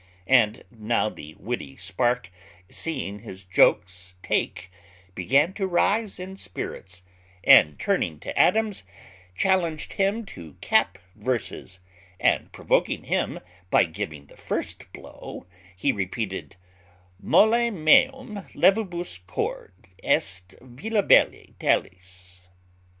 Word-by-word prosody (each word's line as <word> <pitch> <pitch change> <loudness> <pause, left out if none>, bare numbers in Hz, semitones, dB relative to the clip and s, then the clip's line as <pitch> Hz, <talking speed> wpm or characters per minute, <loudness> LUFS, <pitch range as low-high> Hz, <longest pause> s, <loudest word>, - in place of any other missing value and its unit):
And 110 -4 +4
now 110 -1 0
the 75 -6 -11
witty 95 - -5
spark, 95 +3 -1 0.4
seeing 130 -11 -4
his 95 -1 -11
jokes 90 0 +2
take, 95 +1 -2 0.4
began 140 - +2
to 195 -1 -2
rise 200 +4 +1
in 190 +1 -8
spirits; 90 - -7 0.4
and, 75 -2 +6
turning 80 -3 -1
to - - -6
Adams, 220 -2 +2 0.5
challenged 170 - 0
him 200 +4 0
to 85 - -11
cap 90 - +1 0.2
verses, 110 -4 -4 0.4
and, - - +1
provoking - - 0
him - - -2 0.3
by - - +5
giving 80 -3 -6
the - - -19
first - - -5
blow, - - -10 0.3
he - - +2
repeated 95 0 -4 0.7
_"Molle 235 +2 +4
meum 215 - +3
levibus 180 - +1
cord 90 - -4 0.3
est 95 -1 0
vilebile 200 - +2
telis." 90 -1 -3
110 Hz, 105 wpm, -25 LUFS, -, 0.7 s, and